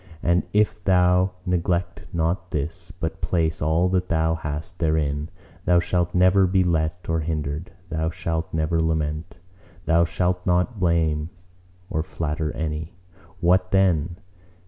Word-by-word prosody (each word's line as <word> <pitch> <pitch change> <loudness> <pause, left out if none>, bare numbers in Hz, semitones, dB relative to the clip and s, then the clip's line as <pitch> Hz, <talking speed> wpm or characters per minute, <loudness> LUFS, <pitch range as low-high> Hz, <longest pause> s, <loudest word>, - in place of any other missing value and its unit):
And 85 +1 +3
if 105 0 +1
thou 90 0 +3
neglect 90 -1 -1
not 85 +2 -1
this, 75 +2 -4
but - - -5
place 80 -3 0
all 80 +4 +2
that 90 -1 0
thou 80 0 +2
hast 80 +2 -5
therein, 75 -2 0 0.4
thou 90 -1 +5
shalt 90 0 0
never 95 +1 +5
be 95 0 +3
let 80 0 -1
or 80 0 +1
hindered; 75 0 -3 0.2
thou 80 -1 -1
shalt 85 -2 -3
never 80 +1 0
lament; 80 +1 -1 0.5
thou 85 +1 +4
shalt 90 +1 0
not 90 +5 +1
blame 80 -3 +1 0.6
or 80 - 0
flatter 75 -1 -3
any. 80 +1 -4 0.5
What 90 +1 +3
then? 90 -3 +2
85 Hz, 135 wpm, -24 LUFS, 80-90 Hz, 0.6 s, thou